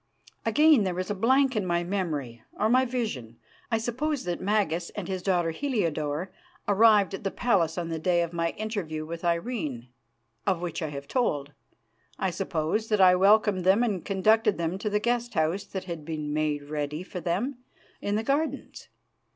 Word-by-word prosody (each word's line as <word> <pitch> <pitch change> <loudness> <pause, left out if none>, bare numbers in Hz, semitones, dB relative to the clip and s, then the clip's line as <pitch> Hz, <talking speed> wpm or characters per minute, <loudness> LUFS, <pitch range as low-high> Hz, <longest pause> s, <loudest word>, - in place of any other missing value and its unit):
Again 300 -6 +5
there 180 -2 -2
is 185 +2 -2
a - - +1
blank 260 +6 +3
in 210 - +1
my 175 -1 0
memory, 155 - -3 0.2
or 215 - +2
my 255 +2 +4
vision. 210 - -4 0.3
I 225 - +2
suppose 255 +6 -2
that 175 -1 -3
Magas 185 -4 0
and 205 -4 -4
his 190 -1 -3
daughter 175 -3 +1
Heliodore 165 - -2 0.4
arrived 205 -2 +5
at 195 - -5
the 195 - 0
palace 185 -9 +1
on 170 -1 -3
the 165 -1 -3
day 175 +1 +2
of 170 0 -5
my 165 0 0
interview 190 -8 -4
with 165 +2 -7
Irene, 170 - -2 0.6
of 190 -4 +2
which 175 -1 -4
I 160 - -1
have 140 -1 -7
told. 145 - -1 0.6
I 190 - 0
suppose 185 +3 -1
that 210 -2 +1
I 185 -1 +7
welcomed 200 0 +4
them 195 +6 +4
and 200 -7 -1
conducted 210 +2 +3
them 170 +3 -2
to 210 - -2
the 210 0 +1
guest 240 +1 -1
house 160 +5 0
that 190 - -5
had 170 -4 -6
been 150 -1 -4
made 150 -1 0
ready 150 +2 -4
for 185 -1 -7
them 205 +10 -2 0.4
in 205 - -1
the 220 - 0
gardens. 280 +2 -2
185 Hz, 185 wpm, -27 LUFS, 165-220 Hz, 0.6 s, I